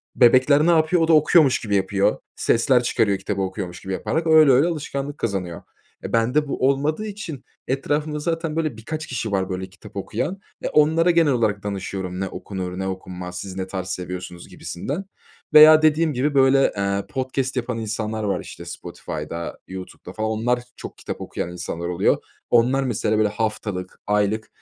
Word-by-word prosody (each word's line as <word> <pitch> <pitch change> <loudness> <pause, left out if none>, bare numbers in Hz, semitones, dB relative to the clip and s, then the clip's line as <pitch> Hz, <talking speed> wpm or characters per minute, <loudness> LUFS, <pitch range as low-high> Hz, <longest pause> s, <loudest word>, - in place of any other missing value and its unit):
Bebekler 130 +5 +5
ne - - +6
yapıyor? 165 +1 +3
O 165 - +3
da 165 - +4
okuyormuş 155 -2 +5
gibi 105 -2 -1
yapıyor, 100 0 +1 0.2
sesler 125 +1 +3
çıkarıyor 100 -4 +1
kitabı 100 0 -3
okuyormuş 95 -2 -4
gibi 95 - -5
yaparak. 160 - -1
Öyle 155 -3 +7
öyle 135 +6 +5
alışkanlık 145 -3 -4
kazanıyor. 95 -6 -3 0.4
E, - - -6
bende 125 +6 +2
bu 130 -1 0
olmadığı 150 +9 0
için 195 -10 -7 0.2
etrafımda 150 +3 -1
zaten 165 0 -2
böyle 155 -7 -1
birkaç 155 +8 -5
kişi 115 -4 -3
var 95 -1 0
böyle 95 0 -4
kitap 100 +2 -15
okuyan. 150 - -3 0.2
E, - - -2
onlara 160 +3 +4
genel 165 -3 +3
olarak 110 -4 0
danışıyorum, 95 -2 -4
ne 95 - -1
okunur 95 -1 -6
ne 95 - -2
okunmaz, 90 -1 -6
siz 95 0 -7
ne 95 0 -4
tarz 95 -1 -5
seviyorsunuz, 90 -1 -6
gibisinden. 145 - -5 0.5
Veya 155 +1 +9
dediğim 155 0 +3
gibi 140 +4 0
böyle, 135 0 +4
eee, 100 0 -1
podcast 130 0 -2
yapan 125 -1 -2
insanlar 110 0 -3
var, 100 -2 0
işte, - - -10
Spotify'da, 85 0 -6
YouTube'da 95 -1 -9
falan. 110 +1 -2
Onlar, 115 +3 0 0.2
çok - - -9
kitap - - -6
okuyan 85 - -4
insanlar 85 -1 -5
oluyor. 90 -1 +2 0.3
Onlar, 125 +3 +3
mesela, 110 -3 0
böyle, 110 -1 +3
haftalık, 105 -4 -4
aylık 105 +1 +1
115 Hz, 170 wpm, -22 LUFS, 95-150 Hz, 0.5 s, Veya